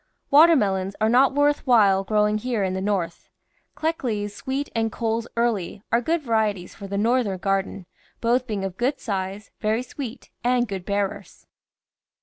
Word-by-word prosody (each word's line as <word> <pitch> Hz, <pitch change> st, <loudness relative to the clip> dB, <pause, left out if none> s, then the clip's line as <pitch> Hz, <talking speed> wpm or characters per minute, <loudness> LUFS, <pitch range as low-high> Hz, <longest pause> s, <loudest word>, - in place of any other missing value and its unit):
Water 325 Hz, +4 st, +8 dB
melons 195 Hz, -5 st, 0 dB
are 220 Hz, 0 st, +2 dB
not 260 Hz, +3 st, +4 dB
worth 290 Hz, 0 st, +2 dB
while 200 Hz, -6 st, +5 dB
growing 210 Hz, +1 st, +1 dB
here 235 Hz, -3 st, -1 dB
in 185 Hz, -1 st, -1 dB
the 190 Hz, -, -2 dB
North. 190 Hz, -4 st, -2 dB, 0.5 s
Kleckley's 230 Hz, -11 st, -2 dB
Sweet 270 Hz, +5 st, -3 dB
and 225 Hz, -1 st, 0 dB
Cole's 230 Hz, 0 st, -2 dB
Early 215 Hz, -4 st, -1 dB
are 235 Hz, +1 st, +3 dB
good 320 Hz, +5 st, 0 dB
varieties 215 Hz, -6 st, 0 dB
for 200 Hz, -, -9 dB
the 200 Hz, 0 st, -3 dB
Northern 225 Hz, -2 st, +1 dB
garden, 195 Hz, 0 st, -2 dB, 0.3 s
both 245 Hz, +2 st, +1 dB
being 205 Hz, -4 st, -2 dB
of 190 Hz, -1 st, -6 dB
good 260 Hz, +4 st, 0 dB
size, 195 Hz, -1 st, -4 dB
very 220 Hz, +3 st, 0 dB
sweet, 255 Hz, -2 st, -8 dB
and 245 Hz, 0 st, +2 dB
good 190 Hz, -3 st, -5 dB
bearers. 200 Hz, 0 st, -3 dB
215 Hz, 160 wpm, -24 LUFS, 195-245 Hz, 0.5 s, Water